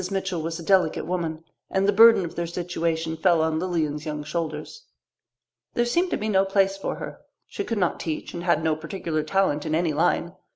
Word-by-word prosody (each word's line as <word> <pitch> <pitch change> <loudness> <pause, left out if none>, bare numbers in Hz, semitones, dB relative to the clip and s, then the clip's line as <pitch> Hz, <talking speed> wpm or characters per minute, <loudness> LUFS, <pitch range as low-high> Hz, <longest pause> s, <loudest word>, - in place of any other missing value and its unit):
Mitchell 190 -3 -2
was 165 +1 -3
a - - -7
delicate 185 -3 +2
woman, 165 -2 -3 0.3
and 195 +1 +1
the 205 - +3
burden 225 -2 +7
of 165 - -7
their 170 0 -3
situation 165 -2 -2
fell 170 +1 +3
on 160 0 0
Lilian's 160 -4 -1
young 150 -1 -4
shoulders. 160 - -5 0.9
There 240 - +2
seemed 345 +10 +1
to - - 0
be 215 - -3
no 195 -3 +3
place 195 0 +2
for 195 - -4
her. - - -7 0.3
She - - -5
could 230 - -3
not 180 -3 0
teach 160 -2 -4
and 170 - -5
had 170 -3 +2
no 160 -1 +2
particular 160 0 -3
talent 155 -2 +1
in 155 - -1
any 165 -1 +1
line. 170 +2 +1
170 Hz, 205 wpm, -25 LUFS, 160-195 Hz, 0.9 s, burden